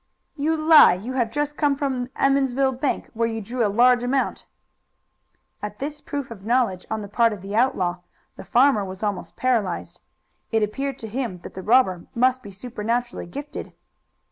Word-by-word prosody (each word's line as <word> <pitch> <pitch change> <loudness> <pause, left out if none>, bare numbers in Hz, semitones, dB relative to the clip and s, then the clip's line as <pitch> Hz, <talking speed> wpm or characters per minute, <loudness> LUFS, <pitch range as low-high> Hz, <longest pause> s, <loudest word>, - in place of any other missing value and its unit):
"You 320 +2 0
lie! 310 - +7
You 220 +8 -6
have 240 -3 0
just 295 +4 -2
come 290 -2 +2
from 270 -3 -2
the 250 - -19
Emmonsville 270 -1 +2
bank, 260 +2 -2
where 230 0 0
you 225 -1 -3
drew 235 +4 -2
a 210 - +2
large 245 +4 +4
amount." 255 +2 -1 1.1
At 210 0 -6
this 295 +3 -5
proof 285 -4 -5
of 200 -4 -9
knowledge 225 -5 0
on 220 0 -2
the - - -7
part 230 +2 +2
of 205 - -8
the 200 +1 -5
outlaw 185 -7 +1 0.4
the - - -9
farmer 255 -3 +3
was 190 +1 -7
almost 195 -5 -3
paralyzed. 225 -9 -1 0.5
It 225 -1 +2
appeared 270 +5 -2
to 225 - -7
him 230 -4 -3
that - - -10
the 190 - -7
robber 190 -5 +3
must 255 +2 +2
be 205 - -10
supernaturally 235 +2 -3
gifted. 285 +10 -7
240 Hz, 180 wpm, -23 LUFS, 210-270 Hz, 1.1 s, lie